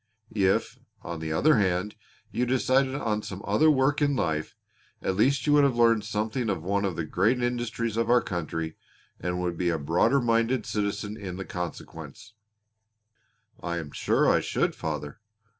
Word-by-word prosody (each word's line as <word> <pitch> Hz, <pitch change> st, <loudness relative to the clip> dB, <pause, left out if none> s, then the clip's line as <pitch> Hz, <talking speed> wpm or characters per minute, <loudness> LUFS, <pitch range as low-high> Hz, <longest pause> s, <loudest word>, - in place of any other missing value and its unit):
If, 95 Hz, -3 st, +1 dB, 0.2 s
on 85 Hz, -1 st, -5 dB
the 80 Hz, 0 st, -4 dB
other 145 Hz, -, +4 dB
hand, 95 Hz, +1 st, 0 dB, 0.4 s
you 125 Hz, +1 st, 0 dB
decided 130 Hz, +1 st, +2 dB
on 110 Hz, -6 st, -1 dB
some 95 Hz, -1 st, -7 dB
other 155 Hz, +1 st, +4 dB
work 145 Hz, +1 st, +2 dB
in 145 Hz, -1 st, +2 dB
life 80 Hz, -9 st, -2 dB, 0.4 s
you -, -, -7 dB
at 95 Hz, -, 0 dB
least 130 Hz, +7 st, +2 dB
would 145 Hz, -1 st, +5 dB
have 135 Hz, -3 st, +3 dB
learned 115 Hz, -2 st, +3 dB
something 110 Hz, +3 st, -2 dB
of 95 Hz, -5 st, -2 dB
one 100 Hz, +2 st, 0 dB
of 95 Hz, -4 st, -2 dB
the 80 Hz, -, -3 dB
great 105 Hz, +11 st, +1 dB
industries 120 Hz, -2 st, -2 dB
of 115 Hz, -, 0 dB
our 120 Hz, 0 st, +6 dB
country 80 Hz, -2 st, -4 dB, 0.4 s
and 90 Hz, +1 st, -2 dB
would 85 Hz, -2 st, -2 dB
be 90 Hz, -1 st, +1 dB
a 80 Hz, -, 0 dB
broader 85 Hz, -, +2 dB
minded 115 Hz, 0 st, +1 dB
citizen 105 Hz, 0 st, -2 dB
in 95 Hz, -4 st, -6 dB
consequence." 85 Hz, +3 st, -7 dB, 1.3 s
"I 85 Hz, 0 st, -3 dB
am 75 Hz, -4 st, -6 dB
sure -, -, +1 dB
I -, -, +4 dB
should, -, -, 0 dB
father. 75 Hz, -2 st, -5 dB
105 Hz, 170 wpm, -27 LUFS, 85-120 Hz, 1.3 s, our